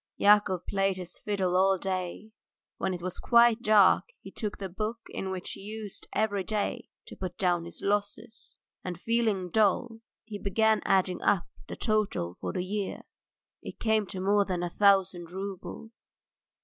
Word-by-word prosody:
Yakov 205 -3 +4
played 195 -1 0
his 180 -1 -8
fiddle 190 -4 -1
all 190 +1 +4
day; 185 +3 -4 0.5
when 190 - -1
it 175 -2 -5
was 185 0 -4
quite 235 -1 +5
dark 210 -4 +5
he - - -11
took 210 -3 -4
the 195 - -4
book 215 +5 -3
in 190 - -4
which 185 -1 -4
he - - -8
used 210 0 -7
every 205 -3 0
day 210 0 -2 0.2
to - - -10
put 185 -2 -6
down 175 -3 +1
his 170 - -10
losses, 205 +3 -3 0.3
and, 180 -2 -5
feeling 215 -5 0
dull, 220 +3 +2 0.2
he 215 -2 -7
began 220 +2 +2
adding 185 -2 +2
up 190 - +2 0.2
the - - -5
total 210 - 0
for - - -5
the 180 -2 -3
year. 200 0 -3 0.6
It - - -9
came 220 -2 +1
to 185 - -6
more 200 +2 +3
than 180 -3 -2
a 175 - -3
thousand 190 -4 +3
roubles. 200 +4 -8
195 Hz, 165 wpm, -29 LUFS, 185-215 Hz, 0.6 s, quite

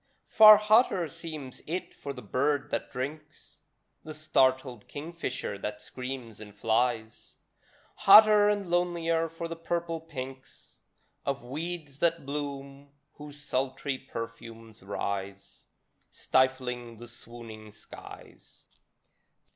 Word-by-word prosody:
Far 215 -1 +10
hotter 210 -4 +3
seems 155 -5 -8
it 175 +4 -4
for 140 - -7
the 125 -2 -9
bird 145 +2 0
that - - -3
drinks, 150 +4 -7 0.5
The 155 -1 -8
startled 130 -6 +1
kingfisher 145 -9 -5
that 105 +1 -5
screams 125 -3 -7
and 105 -1 -11
flies; 110 +1 -1 0.6
Hotter 210 +1 +8
and 205 -2 -1
lonelier 170 -2 0
for 165 +1 -6
the 165 - -6
purple 165 0 -3
pinks 135 -4 -10 0.4
Of 140 -1 -3
weeds 150 +2 -6
that 170 -3 +1
bloom, 140 -1 -6 0.3
whose 150 0 -11
sultry 135 +1 -2
perfumes 115 -2 -9
rise 100 0 -5 0.4
Stifling 125 -3 0
the 120 +2 -11
swooning 115 -2 -12
skies. - - -14
140 Hz, 105 wpm, -29 LUFS, 120-165 Hz, 0.6 s, Far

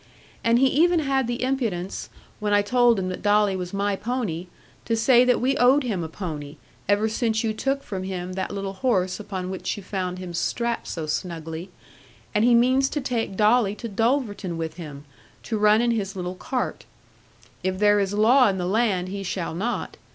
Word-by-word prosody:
And 230 +1 +4
he 265 - +4
even 330 +5 +3
had 270 -3 +1
the 240 +1 -2
impudence, 225 -9 -2 0.3
when 210 -1 0
I 205 - +4
told 240 +1 +4
him 185 -1 -2
that 185 - -5
Dolly 205 -1 +3
was 180 -1 -4
my 200 0 0
pony, 205 -7 -3 0.4
to 230 - +1
say 240 +2 +5
that 250 0 +3
we 265 +3 +1
owed 260 +4 +5
him 205 -9 -2
a - - -3
pony, 155 -5 -6 0.3
ever 205 +2 +3
since 220 0 0
you 220 -1 0
took 270 +5 -1
from 190 -2 -5
him 185 -1 -4
that 190 0 -3
little 195 -1 -4
horse 190 -5 0
upon 190 -3 -5
which 190 - -3
you 205 - -8
found 185 -2 -3
him 180 -1 -7
strapped 235 +7 -1
so 160 -2 -4
snugly; 165 +1 -4 0.6
and 210 0 +2
he 240 0 +5
means 260 +3 +4
to 295 - -2
take 235 -7 -2
Dolly 210 -1 +3
to 235 - -6
Dulverton 220 -5 -1
with 165 0 -4
him, 150 -4 -8 0.4
to 220 -2 -2
run 210 +1 +5
in 240 - +2
his 200 -3 -2
little 180 -1 -4
cart. 250 +7 -3 0.8
If 185 0 -1
there 205 +1 +4
is 195 -1 0
law 230 +5 +5
in 195 -2 0
the 180 - -2
land 190 -2 +1
he 200 +1 -4
shall 185 -3 -3
not. 215 +8 -3
205 Hz, 195 wpm, -24 LUFS, 185-240 Hz, 0.8 s, say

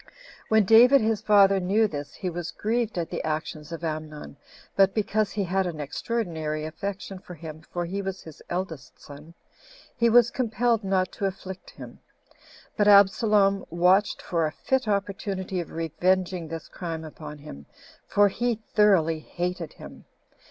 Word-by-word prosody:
2. - - -32 0.4
When 220 -2 +4
David 245 +6 +7
his 220 -1 0
father 200 -2 +5
knew 200 +4 +2
this, 145 -5 -7
he 190 - -5
was 175 -1 -4
grieved 225 -1 -2
at 170 -2 -3
the 175 - -3
actions 155 0 -4
of 165 0 -7
Amnon; 155 -2 -5 0.4
but 195 -1 +4
because 215 -1 0
he 205 - -1
had 190 +1 0
an 165 -3 -5
extraordinary 155 -1 -3
affection 195 +4 -6
for 180 -1 -11
him, 155 -1 -9
for 175 -1 -2
he 195 +4 -3
was 195 -1 -5
his 160 -3 -12
eldest 175 -5 -5
son, 150 +4 -13 0.6
he 235 -1 +3
was 240 0 +5
compelled 235 -2 0
not 190 -1 0
to 200 - -4
afflict 190 0 -8
him; - - -12 0.8
but 205 - +2
Absalom 200 0 +5
watched 180 +4 +2
for 165 -3 0
a - - -5
fit 260 - -1
opportunity 195 -2 -2
of 170 - -5
revenging 175 +2 -1
this 165 -1 -7
crime 165 -2 -6
upon 150 -1 -9
him, 75 - -11 0.4
for 205 0 +4
he 235 +2 -1
thoroughly 180 -7 +4
hated 175 0 -4
him. - - -12
185 Hz, 160 wpm, -26 LUFS, 160-205 Hz, 0.8 s, David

